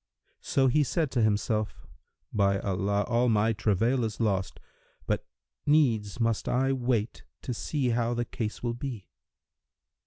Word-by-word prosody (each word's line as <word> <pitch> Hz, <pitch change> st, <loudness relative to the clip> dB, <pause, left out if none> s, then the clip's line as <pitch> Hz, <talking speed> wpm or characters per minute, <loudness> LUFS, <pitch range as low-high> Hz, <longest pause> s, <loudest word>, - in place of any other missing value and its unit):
So 135 Hz, -, +1 dB
he 130 Hz, +4 st, +4 dB
said 150 Hz, +1 st, -1 dB
to 120 Hz, -, +1 dB
himself, 110 Hz, 0 st, 0 dB, 0.5 s
"By 100 Hz, -2 st, +3 dB
Allah, 100 Hz, +1 st, 0 dB
all 120 Hz, +2 st, +2 dB
my 110 Hz, +1 st, +3 dB
travail 110 Hz, +5 st, +1 dB
is 110 Hz, -1 st, -3 dB
lost! 95 Hz, -5 st, 0 dB, 0.5 s
But -, -, -1 dB, 0.4 s
needs 120 Hz, -9 st, +2 dB
must 115 Hz, -2 st, 0 dB
I 135 Hz, +2 st, +2 dB
wait 120 Hz, -4 st, -1 dB, 0.2 s
to 125 Hz, -, -3 dB
see 130 Hz, +2 st, -1 dB
how 120 Hz, 0 st, +1 dB
the 120 Hz, 0 st, -1 dB
case 110 Hz, -2 st, -5 dB
will 120 Hz, -1 st, 0 dB
be." 120 Hz, -4 st, -6 dB
115 Hz, 145 wpm, -28 LUFS, 105-125 Hz, 0.5 s, he